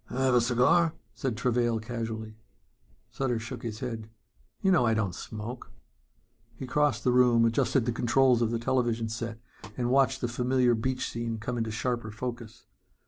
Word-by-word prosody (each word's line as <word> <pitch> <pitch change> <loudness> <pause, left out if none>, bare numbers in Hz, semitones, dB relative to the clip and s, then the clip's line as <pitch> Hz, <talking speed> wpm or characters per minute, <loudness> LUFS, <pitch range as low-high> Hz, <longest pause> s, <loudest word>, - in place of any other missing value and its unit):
"Have 130 +1 +1
a 120 - +5
cigar?" 125 +8 +3 0.2
said 130 -7 -3
Travail 120 -1 +1
casually. 110 -1 -5 0.7
Sutter 130 -3 -1
shook 120 +1 -6
his 110 -3 -6
head. 115 -2 -5 0.5
"You 190 - +4
know 175 -9 +4
I 115 -2 +2
don't 100 -5 0
smoke." 110 +6 -7 0.8
He 130 - -6
crossed 135 -2 +1
the 125 - +3
room, 120 -2 +5
adjusted 115 +2 +2
the 120 - +1
controls 120 +1 +3
of 115 - +2
the 115 - -1
television 120 -2 0
set 115 0 -4 0.4
and 120 -1 0
watched 135 0 +3
the 120 - 0
familiar 125 +1 +2
beach 130 +3 -1
scene 115 -1 -3
come 115 +3 -4
into 115 -2 -2
sharper 120 +1 -2
focus. 115 0 -7
120 Hz, 165 wpm, -28 LUFS, 115-125 Hz, 0.8 s, a